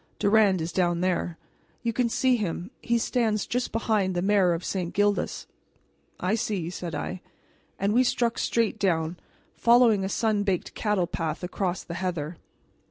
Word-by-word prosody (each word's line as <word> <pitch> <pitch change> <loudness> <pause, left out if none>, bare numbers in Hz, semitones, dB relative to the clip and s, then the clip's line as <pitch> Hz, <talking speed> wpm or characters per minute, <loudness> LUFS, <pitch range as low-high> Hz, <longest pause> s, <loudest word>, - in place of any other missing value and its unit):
"Durand 205 -3 +4
is 165 +2 -3
down 175 -1 +1
there 175 -2 -1 0.5
you 230 -1 0
can 240 0 +1
see 255 +2 +2
him; 190 -2 -3
he 235 0 +1
stands 225 -3 0
just 250 +1 -2
behind 215 -4 0
the 175 - 0
mayor 195 -3 +4
of 170 +1 -4
St. 180 -3 -3
Gildas." 205 0 +1 0.7
"I 185 +3 0
see," 195 -6 -1
said 175 -3 -5
I; 180 +5 -4 0.6
and 200 +2 0
we 250 +3 +5
struck 235 -1 0
straight 225 -2 0
down, 170 -3 0 0.4
following 235 -4 +5
a 190 - -2
sun 215 0 +1
baked 195 -3 -1
cattle 210 -4 0
path 165 -1 -3
across 180 0 -2
the 170 - -7
heather. 170 -3 -3
195 Hz, 165 wpm, -26 LUFS, 175-220 Hz, 0.7 s, we